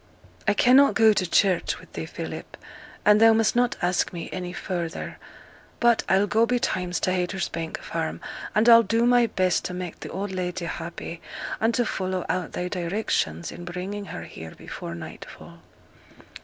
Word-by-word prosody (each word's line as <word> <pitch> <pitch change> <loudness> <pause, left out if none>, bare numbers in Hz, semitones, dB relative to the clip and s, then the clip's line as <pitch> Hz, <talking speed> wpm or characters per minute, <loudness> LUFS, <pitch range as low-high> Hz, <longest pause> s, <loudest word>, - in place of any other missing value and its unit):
'I 205 - +4
cannot 260 +6 +6
go 220 -2 +6
to 185 -4 -1
church 190 -2 +2
wi' - - -13
thee, - - -5
Philip; - - -7 0.5
and 210 +1 +6
thou 225 0 +8
must 220 0 +2
not 245 0 +2
ask 180 +1 +1
me 170 -3 -6
any 180 -1 -4
further. 175 -2 -4 0.6
But 235 -2 +4
I'll 190 +1 +4
go 225 +3 +2
betimes 180 -7 0
to 185 - +1
Haytersbank 175 -3 -2
Farm, - - -4 0.4
and 215 +2 +4
I'll 230 -1 +9
do 230 +2 +1
my 245 -1 +5
best 185 -4 +1
to 180 - -4
make 180 -2 -6
the - - -7
old 195 +2 -4
lady 180 -1 -3
happy, 170 0 -6 0.4
and 225 +1 +3
to 245 - +2
follow 185 -3 -2
out 185 -2 -2
thy 180 - -2
directions 175 - -1
in 175 - -9
bringing 185 +4 -5
her 85 - -7
here 80 0 -10
before 85 - -7
nightfall.' 85 - -10
185 Hz, 170 wpm, -25 LUFS, 175-220 Hz, 0.6 s, I'll